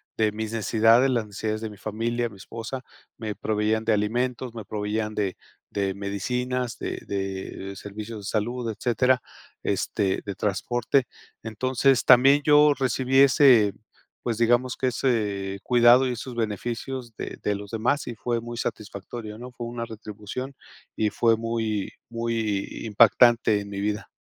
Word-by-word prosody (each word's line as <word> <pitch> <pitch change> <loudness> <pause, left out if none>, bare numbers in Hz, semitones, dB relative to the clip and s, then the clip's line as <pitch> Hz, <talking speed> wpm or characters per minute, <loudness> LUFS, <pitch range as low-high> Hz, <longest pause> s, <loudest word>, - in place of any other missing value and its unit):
de 110 -1 +2
mis 110 +1 -5
necesidades, 115 +3 +4
las 120 -4 0
necesidades 105 +1 -3
de 110 -1 -4
mi 105 - -12
familia, 115 +3 -2
mi 105 - -14
esposa, 115 +6 -6 0.4
me 110 -2 -4
proveían 110 +1 0
de 110 0 +2
alimentos, 120 +4 -1
me 115 -2 -7
proveían 105 +1 -3
de 100 -3 -1 0.4
de 100 -1 -1
medicinas, 125 +5 -2
de - - -4
de 95 0 -4
servicios 105 +3 -7
de - - -11
salud, 115 +2 -2
etcétera, 125 +3 +1 0.4
este, 95 -2 0
de 100 -2 -5
transporte. 120 +6 0 0.4
Entonces, 130 +3 +1
también 135 +3 +7
yo 150 0 +6
recibí 130 0 0
ese, 130 -6 +6 0.5
pues, 115 -2 -2
digamos 120 +2 +2
que 130 - 0
ese 105 -6 -1
cuidado 120 +1 +6
y - - -1
esos 125 +1 -6
beneficios 120 +2 -4
de - - -6
de 105 - 0
los 100 0 -8
demás 125 +6 0
y 120 - -5
fue 120 +1 -2
muy 120 +1 -7
satisfactorio, 105 +1 -6
¿no?, 125 +1 -8
fue 120 -1 -7
una 120 0 -4
retribución, 110 +4 -7 0.4
y 110 - +1
fue 115 +1 +3
muy 115 -3 -2 0.2
muy 115 -4 -1 0.2
impactante 115 0 +5
en 100 - -9
mi 100 -1 -4
vida. 105 0 -2
115 Hz, 150 wpm, -25 LUFS, 105-125 Hz, 0.5 s, también